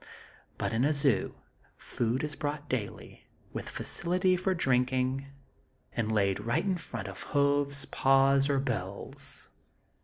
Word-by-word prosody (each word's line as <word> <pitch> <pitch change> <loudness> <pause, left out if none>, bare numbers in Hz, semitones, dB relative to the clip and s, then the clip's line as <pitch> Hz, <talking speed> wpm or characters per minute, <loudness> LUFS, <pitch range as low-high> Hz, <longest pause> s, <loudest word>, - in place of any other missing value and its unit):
But - - -2
in 115 +2 +2
a 150 +3 +3
zoo, 140 -8 +2 0.4
food 120 +3 -1
is 150 -1 -3
brought 145 0 -3
daily, 115 -7 -5 0.3
with - - -5
facility 180 +2 +1
for 185 +1 0
drinking, 130 -1 +1 0.7
and 110 -1 0
laid 100 -3 +2
right 120 - 0
in 190 -2 +1
front 115 -9 -6
of 95 -1 -7
hoofs, 140 0 +1
paws 135 +1 +4
or 140 - +2
bills. 100 -8 -3
135 Hz, 130 wpm, -30 LUFS, 115-145 Hz, 0.7 s, paws